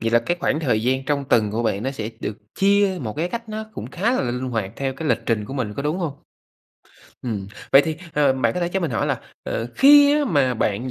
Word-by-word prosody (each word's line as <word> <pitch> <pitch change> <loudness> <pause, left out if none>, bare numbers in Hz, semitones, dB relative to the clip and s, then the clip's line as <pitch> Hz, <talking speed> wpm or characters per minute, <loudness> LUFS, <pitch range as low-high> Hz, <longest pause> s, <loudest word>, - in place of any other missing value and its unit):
vậy 115 0 0
là 120 - +5
cái 175 +9 -1
khoảng 155 - 0
thời 125 -8 +1
gian 130 +2 0
trong 140 0 -1
tuần 110 -5 +2
của 115 +3 -1
bạn 100 -2 -1
nó 130 - -1
sẽ 115 -5 -5
được 105 - -4 0.2
chia 200 -1 +3
một 110 -5 -4
cái 165 +3 -1
cách 230 +2 -6
nó 215 0 -4
cũng - - -6
khá 205 +7 0
là - - +1
l - - -2
linh 125 +1 -2
hoạt 110 -4 -2
theo 135 -1 -2
cái 155 +3 -4
lịch 115 - +3
trình 110 -3 0
của 135 - -7
mình, 115 -6 -3
có - - -4
đúng 150 +5 -1
hông? 165 -6 -2 1.1
Ừm, 105 -5 -3 0.3
vậy 135 - +8
thì, 160 +1 -3 0.2
ờ, 145 -2 +3
bạn 130 -3 +1
có 180 - -2
thể 175 - 0
cho 190 +2 -1
mình 165 -5 -1
hỏi 115 - 0
là, - - -1 0.2
ờ, 115 - -3
khi 285 +1 +7
á, 295 - +1
mà 140 - +2
bạn 110 +3 -1
135 Hz, 270 wpm, -22 LUFS, 115-175 Hz, 1.1 s, vậy